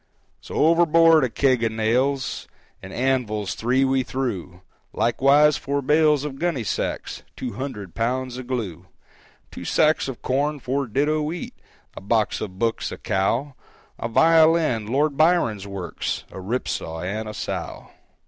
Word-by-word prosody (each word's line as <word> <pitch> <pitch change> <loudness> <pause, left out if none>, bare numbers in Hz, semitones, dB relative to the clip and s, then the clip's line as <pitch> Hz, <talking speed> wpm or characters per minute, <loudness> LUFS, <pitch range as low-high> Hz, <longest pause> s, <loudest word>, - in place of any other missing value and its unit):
So - - -9
overboard 165 0 +5
a 130 - +1
keg 130 -1 +2
of 115 - +1
nails 125 +5 0 0.3
And 95 - -10
anvils 120 -5 -1
three 130 +4 +1
we 135 0 +2
threw, 105 -9 -4 0.3
Likewise 140 +5 +4
four 140 0 -2
bales 150 0 +3
of 135 -2 -6
gunny 165 -8 -1
sacks, 105 - -3
Two 125 - -5
hundred 105 - -6
pounds 125 +3 -2
of 125 - -8
glue, 95 -9 -4 0.6
Two - - -8
sacks 155 -1 +2
of 135 -3 -7
corn, 145 +3 0
four 135 +1 -2
ditto 150 +6 +1
wheat, 160 +3 -4 0.4
A - - -8
box 110 +2 0
of 95 -3 -6
books, 115 +1 -1
a - - -6
cow, 115 +9 -1 0.5
A - - -2
violin, 160 -4 +4
Lord 140 +4 +1
Byron's 155 - +2
works, 95 -3 -4
A - - -8
rip 115 +7 -2
saw 80 0 -4
and 110 +4 -4
a - - -6
sow. - - -5
130 Hz, 150 wpm, -23 LUFS, 110-145 Hz, 0.6 s, overboard